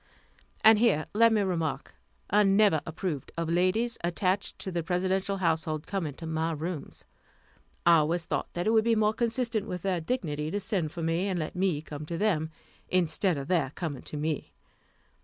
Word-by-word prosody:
And 220 Hz, -1 st, +8 dB
here 205 Hz, -10 st, +3 dB
let 230 Hz, +2 st, +5 dB
me 215 Hz, -2 st, +3 dB
remark, 170 Hz, -5 st, -2 dB, 0.4 s
I 210 Hz, +2 st, +5 dB
never 195 Hz, -5 st, +4 dB
approved 160 Hz, -3 st, -4 dB
of 165 Hz, -1 st, -1 dB
ladies, 190 Hz, +7 st, +1 dB
attached 185 Hz, +3 st, 0 dB
to 190 Hz, -, -4 dB
the 175 Hz, -1 st, -1 dB
Presidential 190 Hz, +3 st, 0 dB
household, 160 Hz, -3 st, 0 dB
coming 165 Hz, -8 st, -3 dB
to 165 Hz, -, -8 dB
my 160 Hz, +1 st, -1 dB
rooms. 160 Hz, 0 st, -6 dB, 0.8 s
I 170 Hz, -1 st, +7 dB
always 165 Hz, +2 st, +1 dB
thought -, -, -2 dB
that 175 Hz, +1 st, -2 dB
it 220 Hz, -, +3 dB
would 220 Hz, -1 st, +4 dB
be 230 Hz, 0 st, +3 dB
more 215 Hz, 0 st, +2 dB
consistent 230 Hz, -2 st, -1 dB
with 180 Hz, -1 st, -5 dB
their 185 Hz, -3 st, 0 dB
dignity 155 Hz, -8 st, -2 dB
to 205 Hz, -, -2 dB
send 180 Hz, -6 st, -1 dB
for 170 Hz, -, -5 dB
me, 165 Hz, +4 st, 0 dB
and 190 Hz, -2 st, -1 dB
let 155 Hz, +1 st, -4 dB
me 180 Hz, -5 st, 0 dB
come 150 Hz, -1 st, -8 dB
to 170 Hz, -, -3 dB
them, 165 Hz, -6 st, +1 dB, 0.4 s
instead 180 Hz, 0 st, +2 dB
of 140 Hz, 0 st, -5 dB
their 165 Hz, -7 st, +1 dB
coming 155 Hz, -7 st, -4 dB
to 150 Hz, -, -7 dB
me. 155 Hz, 0 st, -3 dB
175 Hz, 185 wpm, -28 LUFS, 160-200 Hz, 0.8 s, And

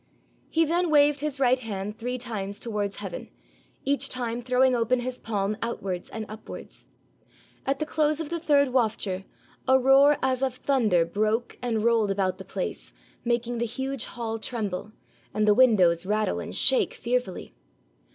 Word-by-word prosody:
He 325 Hz, 0 st, +3 dB
then 345 Hz, +2 st, +1 dB
waved 290 Hz, -1 st, +4 dB
his 290 Hz, -1 st, -2 dB
right 255 Hz, -1 st, +3 dB
hand 210 Hz, -3 st, -5 dB
three 245 Hz, +3 st, -3 dB
times 205 Hz, -5 st, -4 dB
towards 210 Hz, -4 st, -2 dB
heaven, 195 Hz, -4 st, -6 dB, 0.6 s
each 280 Hz, +1 st, +1 dB
time 240 Hz, -1 st, -3 dB
throwing 255 Hz, +1 st, +3 dB
open 240 Hz, +1 st, +1 dB
his 250 Hz, 0 st, -4 dB
palm 210 Hz, -1 st, -1 dB
outwards 195 Hz, -6 st, -3 dB
and 220 Hz, -1 st, -5 dB
upwards. 215 Hz, +1 st, -10 dB, 0.8 s
At 275 Hz, 0 st, +1 dB
the 310 Hz, -, -2 dB
close 305 Hz, 0 st, +1 dB
of 320 Hz, -3 st, -4 dB
the 340 Hz, -, -2 dB
third 285 Hz, -4 st, +3 dB
wafture, 215 Hz, -6 st, 0 dB, 0.4 s
a 260 Hz, -, +6 dB
roar 270 Hz, +2 st, +6 dB
as 260 Hz, -1 st, +1 dB
of 265 Hz, -2 st, 0 dB
thunder 230 Hz, -11 st, +2 dB
broke 215 Hz, +6 st, -1 dB
and 230 Hz, -3 st, -1 dB
rolled 230 Hz, -3 st, +3 dB
about 190 Hz, -1 st, 0 dB
the -, -, -7 dB
place, -, -, -5 dB, 0.3 s
making 240 Hz, 0 st, -1 dB
the 235 Hz, -, +1 dB
huge 265 Hz, +2 st, -3 dB
hall 225 Hz, -2 st, -4 dB
tremble, 210 Hz, -4 st, -3 dB, 0.4 s
and 215 Hz, 0 st, +2 dB
the 210 Hz, -, +7 dB
windows 195 Hz, -9 st, +5 dB
rattle 210 Hz, 0 st, 0 dB
and -, -, -4 dB
shake 265 Hz, -, +3 dB
fearfully. 240 Hz, -5 st, -2 dB
235 Hz, 160 wpm, -26 LUFS, 210-265 Hz, 0.8 s, the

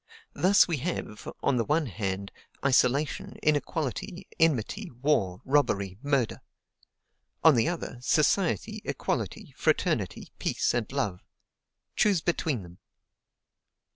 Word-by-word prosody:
Thus 195 Hz, +3 st, +5 dB
we 170 Hz, -4 st, -1 dB
have, 135 Hz, -7 st, -4 dB
on 130 Hz, -, +2 dB
the 115 Hz, -, +2 dB
one 150 Hz, +5 st, +1 dB
hand, 100 Hz, -3 st, -3 dB, 0.3 s
isolation, 140 Hz, +2 st, +2 dB
inequality, 155 Hz, -, -1 dB
enmity, 165 Hz, -, +1 dB
war, 120 Hz, -, 0 dB
robbery, 100 Hz, -9 st, +1 dB
murder; 140 Hz, -5 st, 0 dB, 1.0 s
on 160 Hz, -, +8 dB
the 120 Hz, +5 st, +2 dB
other, 165 Hz, -8 st, -5 dB
society, 155 Hz, -, +1 dB
equality, -, -, -3 dB
fraternity, -, -, 0 dB
peace, -, -, 0 dB
and 120 Hz, -3 st, -1 dB
love. 115 Hz, -10 st, -2 dB, 0.7 s
Choose 200 Hz, -6 st, +3 dB
between 160 Hz, -, -1 dB
them! 85 Hz, 0 st, -14 dB
140 Hz, 105 wpm, -28 LUFS, 110-160 Hz, 1.0 s, on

